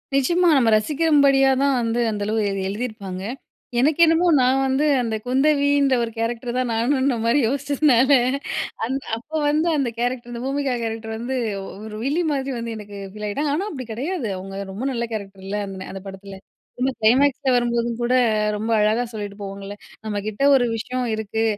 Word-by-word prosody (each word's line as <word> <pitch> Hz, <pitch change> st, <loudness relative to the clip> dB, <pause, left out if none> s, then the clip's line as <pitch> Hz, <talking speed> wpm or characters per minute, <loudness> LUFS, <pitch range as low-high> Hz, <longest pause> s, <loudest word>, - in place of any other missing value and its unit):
நிஜமா! 345 Hz, +6 st, +3 dB
நம்ம 240 Hz, -4 st, +3 dB
ரசிக்கும் 295 Hz, +6 st, +2 dB
படியா 270 Hz, -1 st, +5 dB
தான் 280 Hz, -1 st, +3 dB
வந்து 235 Hz, 0 st, 0 dB
அந்த 205 Hz, -, -4 dB
அளவு 220 Hz, +2 st, 0 dB
எழுதி 195 Hz, -1 st, -2 dB
எழுதியிருப்பாங்க. 200 Hz, -4 st, -5 dB, 0.6 s
எனக்கு 295 Hz, +5 st, +2 dB
என்னமோ 330 Hz, +2 st, +3 dB
நான் 260 Hz, +2 st, +3 dB
வந்து 265 Hz, +3 st, +1 dB, 0.2 s
அந்த 225 Hz, -2 st, -2 dB
குந்தவின்ற 280 Hz, +1 st, +3 dB
ஒரு 230 Hz, -, -3 dB
கேரக்டர் 235 Hz, +1 st, -2 dB
தான் 255 Hz, -1 st, 0 dB
நானுன்ற 260 Hz, +3 st, +1 dB
மாதிரி 235 Hz, +5 st, +3 dB
யோசிச்சதுனால 280 Hz, -1 st, +2 dB, 0.8 s
அந்த 265 Hz, +4 st, -2 dB, 0.2 s
அப்ப 245 Hz, +7 st, -15 dB, 0.2 s
வந்து 310 Hz, +3 st, +1 dB
அந்த 270 Hz, -4 st, 0 dB
கேரக்டர், 245 Hz, 0 st, -2 dB
அந்த 235 Hz, -, -5 dB
பூமிகா 275 Hz, -1 st, -1 dB
கேரக்டர் 225 Hz, 0 st, -4 dB
வந்து 245 Hz, +3 st, -3 dB, 0.5 s
ஒரு 215 Hz, -1 st, -7 dB
வில்லி 295 Hz, +7 st, 0 dB
மாதிரி 270 Hz, -1 st, -2 dB
வந்து 230 Hz, -1 st, -4 dB
எனக்கு 205 Hz, -1 st, -9 dB, 0.2 s
ஃபீல் 210 Hz, 0 st, -6 dB
ஆகிட்டாங்க. 285 Hz, +8 st, -1 dB
ஆனா 390 Hz, +6 st, -2 dB
அப்படி 260 Hz, -4 st, -6 dB
கிடையாது. 280 Hz, -, -3 dB
அவங்க 195 Hz, +1 st, -6 dB
ரொம்ப 210 Hz, +7 st, -5 dB
நல்ல 235 Hz, -2 st, -2 dB
கேரக்டர் 195 Hz, -3 st, -7 dB
இல்ல. 205 Hz, +1 st, -2 dB
அந்த 195 Hz, -, -7 dB
ந -, -, -7 dB
அந்த 195 Hz, -, -7 dB
படத்தில. 195 Hz, 0 st, -9 dB, 0.6 s
கிளைமேக்இஸ்ல 260 Hz, +4 st, +3 dB
வரும்போதும் 235 Hz, -1 st, +1 dB
கூட 240 Hz, +1 st, +1 dB, 0.4 s
ரொம்ப 220 Hz, +2 st, -2 dB
அழகா 215 Hz, +3 st, +2 dB
சொல்லிட்டு 205 Hz, -2 st, -6 dB
போவாங்கல்ல, 200 Hz, 0 st, -7 dB, 0.3 s
"நம்மகிட்ட 210 Hz, +2 st, -4 dB
ஒரு 245 Hz, -, +3 dB
விஷயம் 250 Hz, +3 st, -3 dB
இருக்கு, 220 Hz, +1 st, -2 dB
240 Hz, 170 wpm, -22 LUFS, 215-275 Hz, 0.8 s, படியா